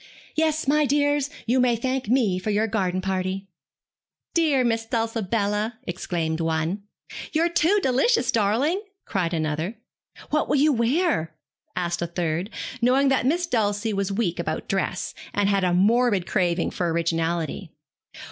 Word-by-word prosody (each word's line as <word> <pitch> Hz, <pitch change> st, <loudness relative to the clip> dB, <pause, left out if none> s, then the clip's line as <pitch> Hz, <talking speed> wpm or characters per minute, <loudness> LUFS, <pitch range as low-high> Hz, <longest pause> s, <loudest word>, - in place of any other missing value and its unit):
Yes, 315 Hz, -2 st, 0 dB
my 300 Hz, +1 st, +3 dB
dears, 290 Hz, 0 st, +2 dB, 0.2 s
you 245 Hz, +3 st, +2 dB
may 250 Hz, -2 st, +3 dB
thank 255 Hz, +1 st, -2 dB
me 225 Hz, -8 st, +2 dB
for 185 Hz, -, -4 dB
your 210 Hz, +1 st, +2 dB
garden 190 Hz, -4 st, -1 dB
party.' 190 Hz, +1 st, -2 dB, 0.9 s
'Dear 305 Hz, -6 st, +3 dB
Miss 225 Hz, -1 st, +1 dB
Dulcibella,' 225 Hz, -1 st, -1 dB
exclaimed 170 Hz, -3 st, -2 dB
one. 165 Hz, +4 st, -1 dB, 0.5 s
'You 330 Hz, +2 st, +3 dB
too 345 Hz, +4 st, +3 dB
delicious 260 Hz, -, +2 dB
darling,' 235 Hz, -, +1 dB, 0.2 s
cried 180 Hz, -5 st, -1 dB
another. 160 Hz, +4 st, -2 dB, 0.6 s
'What 305 Hz, 0 st, +1 dB
will -, -, +3 dB
you 295 Hz, +2 st, +4 dB
wear?' 235 Hz, -, +1 dB, 0.4 s
asked 175 Hz, -1 st, -1 dB
a 170 Hz, -, -1 dB
third, 170 Hz, +2 st, -2 dB, 0.3 s
knowing 265 Hz, +3 st, +4 dB
that 260 Hz, -2 st, +2 dB
Miss 345 Hz, +5 st, +1 dB
Dulcie 215 Hz, -6 st, 0 dB
was 200 Hz, 0 st, -1 dB
weak 195 Hz, -5 st, -1 dB
about 160 Hz, -2 st, -3 dB
dress, 195 Hz, -1 st, -2 dB, 0.2 s
and 205 Hz, -1 st, +2 dB
had 200 Hz, -1 st, +2 dB
a 180 Hz, -, +2 dB
morbid 205 Hz, +1 st, +3 dB
craving 175 Hz, -3 st, 0 dB
for 175 Hz, -2 st, -1 dB
originality. 165 Hz, -1 st, -1 dB
210 Hz, 145 wpm, -24 LUFS, 180-260 Hz, 0.9 s, you